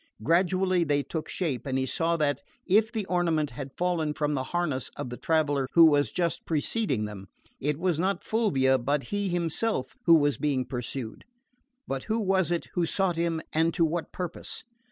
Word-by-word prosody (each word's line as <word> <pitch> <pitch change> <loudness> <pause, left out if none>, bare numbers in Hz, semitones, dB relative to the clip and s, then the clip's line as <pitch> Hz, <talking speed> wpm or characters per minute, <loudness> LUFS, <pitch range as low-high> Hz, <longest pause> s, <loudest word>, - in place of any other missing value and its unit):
Gradually 185 - +2
they 145 -2 +1
took 160 +1 -5
shape, 150 -8 -2
and 130 -1 0
he 130 - 0
saw 165 +5 0
that, 145 -2 0 0.2
if 215 +4 +3
the 220 -4 -2
ornament 170 -5 +1
had 135 -2 -8
fallen 170 -4 0
from 150 -1 0
the 130 -2 -1
harness 150 -5 -2
of 125 - -5
the - - -4
traveller 145 -3 +1
who 165 -2 +8
had 145 0 +2
just 170 -2 -1
preceded 150 - 0
them, 100 -2 -9 0.3
it 150 +1 -1
was 175 -2 0
not 190 +3 0
Fulvia 135 - +2
but 140 +3 0
he 205 -1 0
himself 175 - -1
who 165 - +9
was 145 -2 +2
being 140 -4 0
pursued. 125 -2 -5 0.6
But 135 -1 -3
who 220 +1 0
was 190 -4 +2
it 175 -1 -1
who 175 - +1
sought 190 -1 +1
him 165 -1 0
and 160 +1 +2
to 170 - +4
what 165 +1 -3
purpose? 180 -2 -6
160 Hz, 185 wpm, -27 LUFS, 140-180 Hz, 0.6 s, who